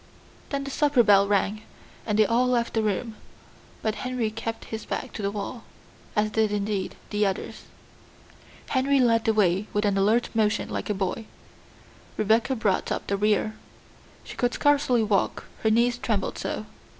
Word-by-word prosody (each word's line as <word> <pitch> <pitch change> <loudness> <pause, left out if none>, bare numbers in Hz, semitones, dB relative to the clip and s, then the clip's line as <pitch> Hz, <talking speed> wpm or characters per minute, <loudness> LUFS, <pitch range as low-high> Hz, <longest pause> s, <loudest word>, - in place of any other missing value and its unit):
Then 280 -1 -2
the 275 - -6
supper 285 -4 +3
bell 200 -2 +5
rang, 205 +1 +1 0.5
and 210 -1 +1
they 215 - +6
all 240 +4 +2
left 240 -2 0
the 225 - +1
room, 215 +1 -2 0.7
but 220 - +1
Henry 250 -3 -1
kept 225 +1 -5
his 220 - -4
back 260 - -5
to - - -5
the 200 - 0
wall 210 +3 -5 0.5
as 210 0 +1
did, 220 -1 +1
indeed, 205 -2 -2 0.2
the 210 0 +1
others. 195 -2 -3 1.0
Henry 275 +1 +2
led 230 -3 +3
the 220 - +3
way 195 0 +2
with 210 0 +1
an 200 -1 +2
alert 220 +5 +2
motion 220 -1 +1
like - - -4
a 210 - 0
boy; 195 +3 -3 0.9
Rebecca 225 +5 +2
brought 210 -5 0
up - - -2
the 200 - -1
rear. 210 +1 +1 0.7
She - - -10
could 245 -1 0
scarcely 285 -5 +3
walk, 205 -3 0 0.2
her 220 - +2
knees 235 +2 +2
trembled - - -2
so. - - -3
220 Hz, 170 wpm, -26 LUFS, 205-240 Hz, 1.0 s, they